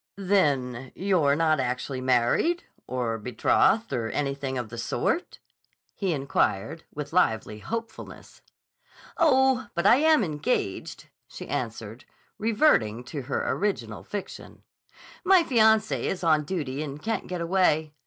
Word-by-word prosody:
"Then 135 -11 0
you're 180 -7 +2
not 155 -1 +2
actually 130 +1 -3
married 130 - +2 0.2
or 120 -3 -2
betrothed 125 - +2
or 115 -3 -2
anything 140 +1 -2
of 120 -3 -4
the 115 +1 -7
sort?" 120 - -2 0.6
he 195 -3 -2
inquired 140 -1 -1
with 150 +1 -7
lively 110 -11 +1
hopefulness. 225 - -7 0.8
"Oh, 265 -5 +3
but 170 - -1
I 235 - +7
am 310 -3 +4
engaged," 150 - -3 0.2
she - - -9
answered, 115 -1 -5 0.3
reverting 205 - +2
to 140 +3 -6
her 135 +2 -3
original 125 - -2
fiction. 200 -2 -8 0.6
"My 370 -1 +5
fiancé 220 -5 +3
is 180 -2 -3
on 155 -2 +3
duty 145 -6 -3
and 145 -1 -6
can't 225 +7 -3
get 180 -1 -4
away. 165 -3 +1
150 Hz, 125 wpm, -26 LUFS, 125-205 Hz, 0.8 s, I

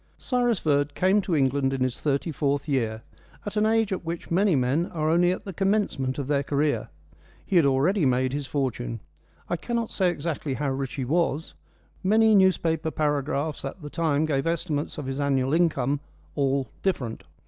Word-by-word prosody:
Cyrus 245 -4 +1
Verd 145 -3 +1
came 190 +3 +3
to 185 -3 -1
England 135 -1 +2
in 135 - -3
his 130 -1 -1
thirty 145 +3 0
fourth 140 0 -1
year, 115 -6 -1 0.5
an 215 0 +2
age 225 -1 +2
at 185 - -4
which 170 +1 -5
many 190 0 +3
men 135 +7 +1
are 155 -2 -1
only 175 +1 +4
at 185 - -4
the 195 - -6
commencement 195 -9 0
of 140 -3 -3
their 140 -1 +2
career. 140 -4 0 0.6
He 195 - -2
had 160 -5 +5
already 155 +8 +2
made 130 -1 +2
his 145 -1 -3
fortune. 125 -4 -2 0.5
I 175 - -1
cannot 235 +4 -2
say 185 -2 +2
exactly 155 -4 -3
how 140 0 -1
rich 135 -1 -3
he 130 - -2
was. 160 +1 0 0.5
Many 220 +3 +4
newspaper 175 -5 +3
paragraphs 150 0 -1
at 140 +5 -6
the 145 - -7
time 155 -2 +1
gave 145 -1 0
estimates 165 -3 -2
of 150 - -5
his 135 +1 -4
annual 135 -1 +1
income 145 -5 +2 0.3
all 135 -2 0
different. 130 -12 -2
150 Hz, 180 wpm, -26 LUFS, 135-175 Hz, 0.6 s, had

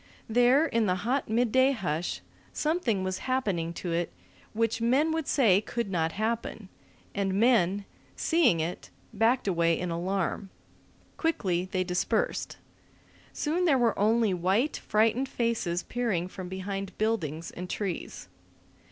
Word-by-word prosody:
There, 245 +6 +4
in 230 -8 +1
the 180 - +2
hot 265 +1 0
midday 250 +4 +3
hush, 175 - -2 0.3
something 300 - 0
was 185 0 -2
happening 195 -11 0
to 175 0 -5
it 170 +1 -1 0.4
which 225 +1 0
men 265 +7 +3
would 320 -2 -2
say 205 -8 +4
could 235 -2 -3
not 165 -3 0
happen; 220 -2 -3 0.4
and 195 -1 -1
men, 205 -3 +3 0.3
seeing 320 - +3
it, 165 +3 -4 0.2
backed 225 +3 +2
away 170 -3 +2
in 180 -1 -3
alarm. 190 +3 -2 0.7
Quickly 185 - 0
they 185 -1 +1
dispersed. 180 0 -1 0.7
Soon 335 +4 -1
there 290 -6 +4
were 235 -3 +2
only 220 0 +3
white, 190 - +1
frightened 225 +5 +1
faces 230 -9 -1
peering 220 -8 -1
from 185 -1 -8
behind 195 0 -5
buildings 170 -8 -1
and 180 +1 -7
trees. 195 -4 -4
210 Hz, 135 wpm, -28 LUFS, 180-245 Hz, 0.7 s, There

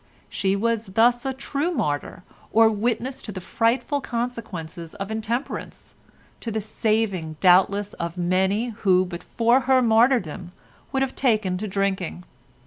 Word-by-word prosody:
She 195 0 0
was 230 +1 0
thus 240 +6 +3
a - - 0
true 280 +4 -2
martyr 180 - -2 0.3
or 225 0 +6
witness 235 +4 -2
to 215 - -6
the 190 - -6
frightful 240 - 0
consequences 220 -10 -5
of 195 +2 -5
intemperance, 225 +4 -4 0.5
to 230 - -5
the 220 0 -1
saving, 215 -6 -1
doubtless, 195 +2 +4
of 170 +1 -5
many 190 +6 +1
who 185 -3 +3
but 175 -1 -7
for 235 +2 +2
her 260 -1 +6
martyrdom 220 - +2 0.4
would 270 0 +1
have 265 - -3
taken 215 -8 +1
to 215 - -3
drinking. 190 -3 -2
215 Hz, 140 wpm, -24 LUFS, 185-240 Hz, 0.5 s, or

